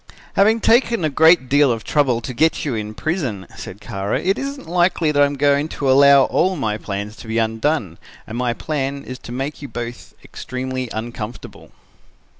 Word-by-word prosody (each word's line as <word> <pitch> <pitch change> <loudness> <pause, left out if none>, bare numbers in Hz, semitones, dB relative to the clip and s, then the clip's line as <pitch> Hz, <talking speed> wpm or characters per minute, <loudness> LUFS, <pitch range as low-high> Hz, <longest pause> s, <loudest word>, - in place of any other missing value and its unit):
"'Having 220 +3 +3
taken 230 -5 +3
a 155 - 0
great 160 -1 +5
deal 140 0 +4
of 115 -2 -3
trouble 130 -6 +1
to 125 - -6
get 160 +7 +1
you 140 - -1
in 110 -1 -4
prison,' 130 - -3
said 100 - -9
Kara, 100 0 -3
'it 195 +2 +1
isn't 275 0 -5
likely 175 -2 +2
that 145 -1 +2
I'm 145 0 +3
going 145 +1 +2
to 135 -2 +1
allow 140 0 +7
all 185 +7 +1
my 110 -8 -2
plans 100 +1 -5
to - - -11
be 110 +1 -2
undone, 115 - -1 0.3
and 110 - -8
my 120 -1 0
plan 140 0 -3
is 130 0 -8
to - - -10
make 135 +5 -4
you 140 - -6
both 120 0 -7
extremely 130 -1 -5
uncomfortable.' 115 0 -7
135 Hz, 185 wpm, -20 LUFS, 115-155 Hz, 0.3 s, allow